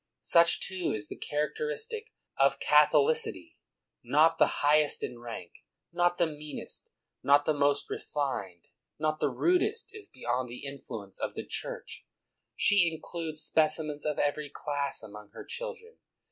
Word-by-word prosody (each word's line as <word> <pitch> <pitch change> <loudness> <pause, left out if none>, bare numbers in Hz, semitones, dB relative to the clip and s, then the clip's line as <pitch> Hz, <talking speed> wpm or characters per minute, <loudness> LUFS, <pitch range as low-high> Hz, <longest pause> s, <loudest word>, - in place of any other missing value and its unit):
Such, 170 0 +5
too, 185 -3 -2
is 105 -1 -5
the - - -6
characteristic 450 - -3 0.2
of 135 0 +3
Catholicity; 150 - +3 0.4
not 155 +6 +4
the - - +2
highest 150 0 +4
in 120 - -5
rank, 115 -7 -7 0.4
not 175 0 +2
the 170 - +4
meanest, 150 -1 -6 0.3
not 145 +1 +4
the 155 - +2
most 145 0 +1
refined, 100 - -4 0.3
not 155 0 -1
the - - +1
n^dest, 365 +5 +1
is 420 -3 -8
beyond 125 +1 -2
the 125 +4 -7
in 140 0 -5
fluence 100 -5 -8
of - - -3
the - - -5
Church: - - -6 0.5
she 185 -5 +5
includes 160 -1 -6
specimens 155 -1 +1
of 150 -1 -1
every 145 0 0
class 145 -2 -3
among 105 -1 -11
her - - -9
children. 475 -1 -6
150 Hz, 145 wpm, -29 LUFS, 140-170 Hz, 0.5 s, Such